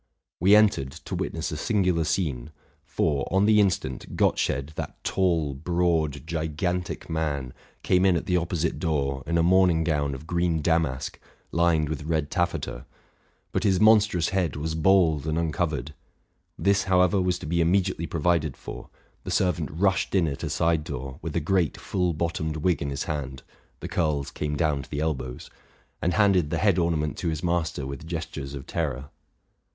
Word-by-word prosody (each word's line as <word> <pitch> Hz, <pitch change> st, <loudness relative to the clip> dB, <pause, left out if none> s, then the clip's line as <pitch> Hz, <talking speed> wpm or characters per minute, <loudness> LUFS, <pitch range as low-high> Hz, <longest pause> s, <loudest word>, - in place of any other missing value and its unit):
We 95 Hz, +4 st, +6 dB
entered, 105 Hz, -11 st, +4 dB
to 85 Hz, +4 st, -9 dB
witness 85 Hz, -3 st, -3 dB
a 75 Hz, -, -3 dB
singular 90 Hz, -4 st, +1 dB
scene: 75 Hz, -7 st, -1 dB, 0.3 s
for, 70 Hz, -4 st, -1 dB
on 95 Hz, +2 st, +3 dB
the 105 Hz, 0 st, +5 dB
instant, 90 Hz, -10 st, -1 dB
Gottsched, 70 Hz, +3 st, +1 dB
that -, -, -5 dB
tall, 85 Hz, -6 st, +1 dB
broad, 80 Hz, -1 st, 0 dB
gigantic 85 Hz, +2 st, -2 dB
man, 75 Hz, -5 st, -2 dB, 0.3 s
came 90 Hz, 0 st, +3 dB
in 95 Hz, -2 st, +4 dB
at 85 Hz, -, -2 dB
the 90 Hz, -, +1 dB
opposite 85 Hz, -2 st, -1 dB
door 70 Hz, -5 st, -1 dB
in 85 Hz, -, +1 dB
a 85 Hz, -, +3 dB
morning 90 Hz, -2 st, +4 dB
gown 75 Hz, -4 st, 0 dB
of 65 Hz, -, -10 dB
green 85 Hz, -2 st, 0 dB
damask 80 Hz, -6 st, 0 dB, 0.3 s
lined 85 Hz, -2 st, +2 dB
with 80 Hz, +1 st, -4 dB
red 80 Hz, -2 st, -1 dB
taffeta; 85 Hz, -8 st, -2 dB, 0.6 s
but -, -, -1 dB
his 95 Hz, -3 st, +3 dB
monstrous 105 Hz, -5 st, +4 dB
head 90 Hz, -7 st, 0 dB
was 80 Hz, +2 st, -3 dB
bald 80 Hz, -3 st, +3 dB
and 80 Hz, +1 st, 0 dB
uncovered. 80 Hz, -2 st, -1 dB, 0.6 s
This, 100 Hz, 0 st, +2 dB
however, 90 Hz, 0 st, +3 dB
was 90 Hz, -1 st, +1 dB
to -, -, -9 dB
be 85 Hz, +3 st, +1 dB
immediately 85 Hz, -1 st, +1 dB
provided 80 Hz, -3 st, 0 dB
for: -, -, -9 dB, 0.3 s
the -, -, -6 dB
servant 90 Hz, -4 st, +1 dB
rushed 95 Hz, +4 st, +1 dB
in 90 Hz, -4 st, +3 dB
at 70 Hz, -2 st, -4 dB
a 80 Hz, -, -3 dB
side 80 Hz, 0 st, +1 dB
door 65 Hz, +1 st, -6 dB
with 80 Hz, -, -5 dB
a -, -, +3 dB
great 85 Hz, 0 st, 0 dB
full 90 Hz, -3 st, -1 dB
bottomed 80 Hz, -1 st, -2 dB
wig 85 Hz, +3 st, +1 dB
in 70 Hz, -, -2 dB
his 70 Hz, 0 st, -3 dB
hand 70 Hz, -5 st, -5 dB, 0.4 s
(the -, -, -4 dB
curls 75 Hz, -4 st, -1 dB
came 75 Hz, 0 st, -3 dB
down 75 Hz, -2 st, +1 dB
to -, -, -13 dB
the 70 Hz, -, -3 dB
elbows), 65 Hz, -5 st, -3 dB, 0.5 s
and 90 Hz, -, 0 dB
handed 95 Hz, -7 st, +3 dB
the -, -, -1 dB
head 100 Hz, -4 st, +3 dB
ornament 80 Hz, -3 st, 0 dB
to 90 Hz, -, -2 dB
his 80 Hz, 0 st, -3 dB
master 85 Hz, -5 st, -1 dB
with 70 Hz, +3 st, -7 dB
gestures 75 Hz, -4 st, -5 dB
of 70 Hz, -, -7 dB
terror. 70 Hz, -4 st, -3 dB
80 Hz, 175 wpm, -26 LUFS, 75-90 Hz, 0.6 s, We